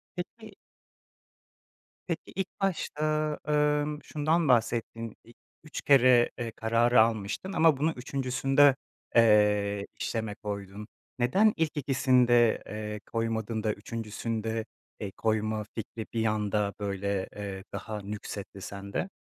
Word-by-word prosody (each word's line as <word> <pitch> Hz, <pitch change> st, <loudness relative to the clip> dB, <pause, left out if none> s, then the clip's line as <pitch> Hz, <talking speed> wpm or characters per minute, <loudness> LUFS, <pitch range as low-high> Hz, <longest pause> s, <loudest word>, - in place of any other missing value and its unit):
Peki 205 Hz, +3 st, -8 dB, 1.5 s
Peki, -, -, -4 dB
ilk 190 Hz, 0 st, -4 dB
başta, 180 Hz, -5 st, -1 dB, 0.5 s
ımm, 150 Hz, 0 st, +2 dB
şundan 155 Hz, +2 st, +1 dB
bahsettin, 115 Hz, -2 st, 0 dB
ilk 115 Hz, -, -18 dB, 0.3 s
3 155 Hz, -, -6 dB
kere, 125 Hz, -3 st, +6 dB
eee, 115 Hz, -2 st, -3 dB
kararı 115 Hz, +1 st, +3 dB
almıştın 110 Hz, -, -1 dB
ama 160 Hz, -5 st, +5 dB
bunu 155 Hz, +3 st, +1 dB
3’üncüsünde, 135 Hz, +2 st, +3 dB, 0.4 s
eee, 105 Hz, -3 st, +4 dB
işleme 110 Hz, -3 st, -2 dB
koydun. 100 Hz, 0 st, -6 dB, 0.3 s
Neden 195 Hz, -, +4 dB
ilk 160 Hz, -1 st, 0 dB
2’sinde, 125 Hz, -4 st, +3 dB
eee, 105 Hz, 0 st, -5 dB
koymadın 115 Hz, -1 st, -1 dB
da 105 Hz, -1 st, +1 dB
3’üncüsünde, 110 Hz, +1 st, -4 dB, 0.3 s
eee, 100 Hz, -2 st, -4 dB
koyma 110 Hz, -1 st, 0 dB
fikri 110 Hz, 0 st, -5 dB
bir 115 Hz, -1 st, 0 dB
anda 105 Hz, -1 st, 0 dB
böyle, 100 Hz, -1 st, -2 dB
eee, 100 Hz, -2 st, -5 dB
daha 105 Hz, -2 st, -5 dB
nüksetti 100 Hz, -1 st, -7 dB
sende? 100 Hz, -, -4 dB
115 Hz, 110 wpm, -29 LUFS, 105-135 Hz, 1.5 s, kere